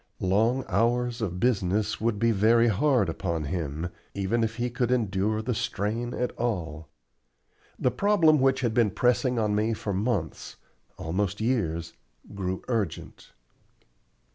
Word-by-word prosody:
Long 110 +8 +2
hours 120 +4 +1
of 90 -5 -2
business 105 -2 0
would 115 -2 +1
be 115 +2 +2
very 115 +3 +4
hard 120 - +2
upon 80 -1 -2
him, 80 +1 -3 0.3
even 100 +4 0
if 115 0 -2
he 120 +1 -2
could 120 -1 -1
endure 110 -2 0
the 125 +2 -1
strain 110 +1 -2
at 125 - -1
all. 80 - -3 0.9
The 125 - +1
problem 170 -7 +4
which 130 0 +2
had 120 -3 0
been 115 -2 +3
pressing 125 +3 +1
on 105 -2 +1
me 110 +2 +1
for 100 -1 -4
months 100 -5 -2 0.4
almost 95 +5 -2
years 85 -9 -1 0.4
grew 95 -2 -3
urgent. 110 -9 -3
110 Hz, 140 wpm, -27 LUFS, 95-120 Hz, 0.9 s, very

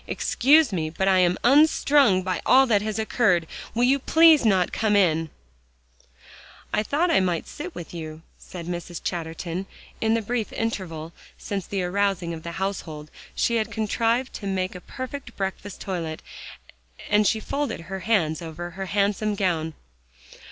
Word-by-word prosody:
Excuse 285 -1 +3
me, 160 -3 -1
but 190 +4 -2
I 190 -1 +5
am 180 0 +3
unstrung 275 -6 +4
by 185 -1 -2
all 265 +1 +6
that 215 -5 +2
has 215 0 -3
occurred. 215 -6 +2 0.3
Will 240 - +2
you 270 +3 +4
please 320 +1 +6
not 190 -5 +2
come 215 -2 +1
in" 165 -5 +2 1.4
"I - - +2
thought 305 +10 +1
I - - +5
might 180 -3 0
sit 335 +4 -7
with 175 - -8
you," 160 -1 -7 0.2
said 175 -2 -9
Mrs. 175 -1 -5
Chatterton. 170 +2 -4 0.3
In 225 0 +2
the 230 - -1
brief 230 0 -2
interval 170 -8 -4 0.2
since 195 -3 -4
the 195 -2 -2
arousing 185 -2 0
of 160 - -7
the 170 +1 -7
household, 160 -5 -4 0.2
she 235 - +1
had 220 - -1
contrived 230 +3 0
to 200 - -6
make 185 -1 -1
a 180 - -9
perfect 260 0 -8
breakfast 195 0 -4
toilet, 165 -5 -4 0.8
and 210 0 +3
she 220 - +2
folded 280 0 -3
her 190 +3 -6
hands 180 -6 +1
over 170 +1 -6
her 190 +2 -6
handsome 205 +1 0
gown. 165 -5 -1
195 Hz, 160 wpm, -24 LUFS, 175-225 Hz, 1.4 s, all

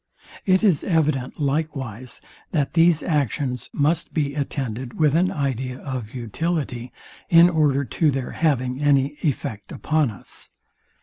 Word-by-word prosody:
It 185 +1 +4
is 185 -9 +3
evident 150 -7 0
likewise, 135 -5 -3 0.3
that 145 -5 0
these 165 -1 +4
actions 140 -5 -1
must 155 +3 0
be 145 -3 0
attended 130 -4 -4
with 150 -3 +4
an 180 +3 +3
idea 130 -3 -2
of 130 -5 -6
utility, 125 - -3 0.4
in 170 +1 +7
order 145 -4 +2
to 155 +6 +1
their 135 -2 -2
having 130 -4 0
any 145 0 +2
effect 115 - -3
upon 155 -4 +1
us. 100 - -9
140 Hz, 130 wpm, -23 LUFS, 130-155 Hz, 0.4 s, in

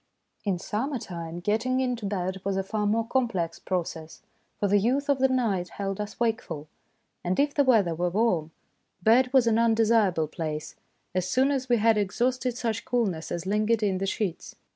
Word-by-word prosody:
In 195 -3 +1
summer 255 +10 -2
time 170 -5 -6
getting 225 +7 +1
into 245 -5 -1
bed 190 -1 -3
was 195 -1 -1
a 195 - 0
far 210 +1 -1
more 225 +2 +1
complex 230 -11 -1
process, 165 -3 -4 0.4
for 205 - +1
the 205 +1 +4
youth 265 +7 0
of 280 -2 +3
the 265 - +5
night 220 -9 0
held 195 0 -4
us 210 0 -7
wakeful; 225 -10 -2 0.6
and 180 +1 -1
if 285 0 +2
the 285 - +3
weather 220 -10 +3
were 175 +2 0
warm, 180 -5 +1 0.5
bed 250 +4 +4
was 260 -3 +5
an 230 -1 +3
undesirable 225 -7 +3
place 155 -1 -5 0.4
as 185 0 -1
soon 265 +6 +3
as 265 -2 -2
we 240 - +4
had 220 0 +3
exhausted 245 +4 0
such 230 -2 -2
coolness 200 -10 -1
as 175 +1 -3
lingered 215 +3 +1
in 190 -3 +1
the 195 - -1
sheets. 190 -3 -3
210 Hz, 185 wpm, -27 LUFS, 185-240 Hz, 0.6 s, the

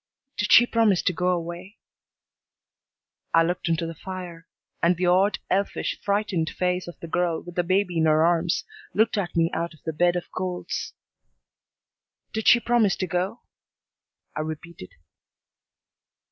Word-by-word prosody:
"Did 210 0 -1
she 240 - +9
promise 225 -6 +2
to 185 - +1
go 180 +2 -1
away?" 175 +3 -4 1.6
I 165 - +6
looked 175 0 -2
into 165 0 0
the 165 - -5
fire, 180 -1 -8 0.3
and 170 +1 +3
the 180 - 0
odd, 185 +3 +3
elfish, 195 +2 -1
frightened 200 -5 0
face 180 0 -1
of 175 - -10
the 170 - -6
girl 170 0 -1
with 175 - -10
the 175 - +1
baby 180 -1 0
in 160 - +3
her 155 +1 +4
arms 170 +1 +1 0.3
looked 220 +2 +3
at 200 -4 -2
me 165 0 +2
out 170 0 -3
of 155 - -26
the 160 - -2
bed 175 +3 +2
of 175 - -4
coals. 185 -1 -4 1.4
"Did 220 0 -2
she 240 - +8
promise 235 -5 +2
to 185 - -2
go?" 185 +6 -2 0.9
I - - -3
repeated. 155 - -6
175 Hz, 155 wpm, -25 LUFS, 165-190 Hz, 1.6 s, she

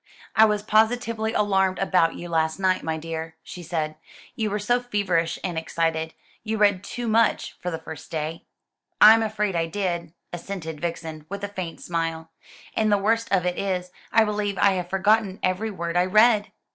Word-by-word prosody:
"I 220 - +8
was 210 -1 0
positively 220 +1 +1
alarmed 190 -3 +2
about 180 -4 +2
you 175 - -7
last 160 0 0
night, 185 -1 +2
my 160 0 -2
dear," 160 0 -6
she 180 - -9
said; 155 -2 -3 0.4
"you 220 -2 -1
were 205 - -1
so 240 +4 +1
feverish 190 -8 0
and 175 -3 -2
excited. 160 0 -2 0.3
You 220 0 -2
read 205 -2 +3
too 240 +2 -5
much, 225 0 +2
for 180 - -2
the 165 - -3
first 160 -1 -10
day." 160 +1 -4 0.5
"I'm 220 +2 +9
afraid 210 -3 -1
I 165 -1 0
did," 170 -2 -3 0.2
assented 170 -3 -6
Vixen, 160 -2 -5
with 200 +1 -6
a - - -1
faint 185 -5 -6
smile; 165 -1 -3 0.4
"and 215 -1 +2
the 205 - +5
worst 225 +3 0
of 185 -3 +2
it 180 0 -1
is, 180 -2 -2 0.2
I 225 - +5
believe 210 -2 -2
I 200 - +5
have 180 -2 -3
forgotten 200 +1 +2
every 185 +4 0
word 170 -4 -4
I 180 +1 +4
read." 215 +1 +4
185 Hz, 185 wpm, -24 LUFS, 165-210 Hz, 0.5 s, I'm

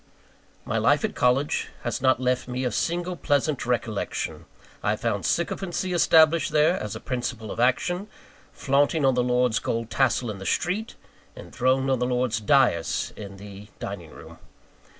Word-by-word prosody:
My - - -1
life - - +3
at - - -3
college 130 +4 +1
has 120 0 -3
not 130 -2 +3
left 125 0 0
me 125 +1 -3
a 125 - 0
single 175 +7 -1
pleasant 145 -3 0
recollection. 115 -4 -2 0.4
I - - +1
found - - -2
sycophancy 185 -1 -1
established 160 -2 +4
there, 155 +4 +3
as 105 -1 -5
a - - -6
principle 120 -4 -4
of - - -6
action; 175 - +1 0.4
flaunting 145 +2 +1
on 135 - +4
the 125 - +2
lord's 125 -2 +2
gold 115 0 -3
tassel 125 -3 +1
in 100 - -8
the 95 - -8
street; 200 +6 -1 0.4
enthroned 130 +1 0
on 130 - +1
the 125 - 0
lord's 125 -2 0
dais 115 - +2
in 100 -2 -9
the 100 +1 -11
dining 90 -5 -6
room. - - -13
125 Hz, 160 wpm, -25 LUFS, 115-150 Hz, 0.4 s, established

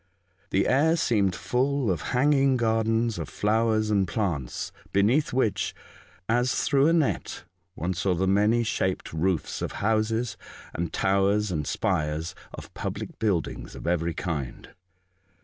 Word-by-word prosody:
The - - +2
air 155 +5 +3
seemed 105 - +1
full 130 -2 0
of 85 - -2 0.2
hanging 135 -1 +4
gardens 115 0 +1
of - - -5
flowers 110 0 +1
and 100 -3 +2
plants, 85 - -2 0.2
beneath 110 +10 +2
which, 125 -5 0 0.5
as 125 +3 +2
through 140 0 +3
a 165 - +4
net, 160 -5 0 0.3
one 90 0 -2
saw 90 +1 0
the 95 +3 0
many 105 +5 +3
shaped 95 -6 -2
roofs 85 +1 -1
of - - -3
houses, 110 +2 0 0.4
and 85 -1 -3
towers 100 +1 +2
and 75 -4 -2
spires 75 +3 -1 0.2
of - - -10
public - - -5
buildings 100 -7 -2
of - - -9
every 85 -1 0
kind. 75 -9 -4
105 Hz, 135 wpm, -26 LUFS, 90-120 Hz, 0.5 s, hanging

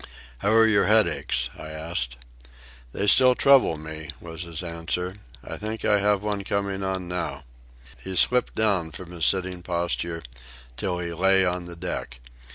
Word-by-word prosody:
"How 105 - +1
are 115 0 +6
your 100 -4 +3
headaches?" 105 - +2
I 80 - -9
asked. 75 -6 -1 0.7
"They 100 - -2
still 125 +4 +6
trouble 135 - +5
me," 80 0 -8
was 85 0 -8
his 85 0 -5
answer. 90 +2 -3 0.3
"I - - -7
think 110 +1 -5
I 105 - +4
have 105 0 +2
one 105 -1 -2
coming 100 -1 -2
on 95 -2 -2
now." 90 -2 -4 0.6
He 95 0 -5
slipped 125 +8 +2
down 95 -7 +1
from 90 +1 -8
his 85 -3 +1
sitting 95 -2 0
posture 85 -1 -2 0.5
till 90 +3 -2
he 85 -1 -4
lay 95 +2 +4
on 90 0 -2
the 85 0 -8
deck. 85 -8 -5
90 Hz, 165 wpm, -25 LUFS, 85-100 Hz, 0.7 s, are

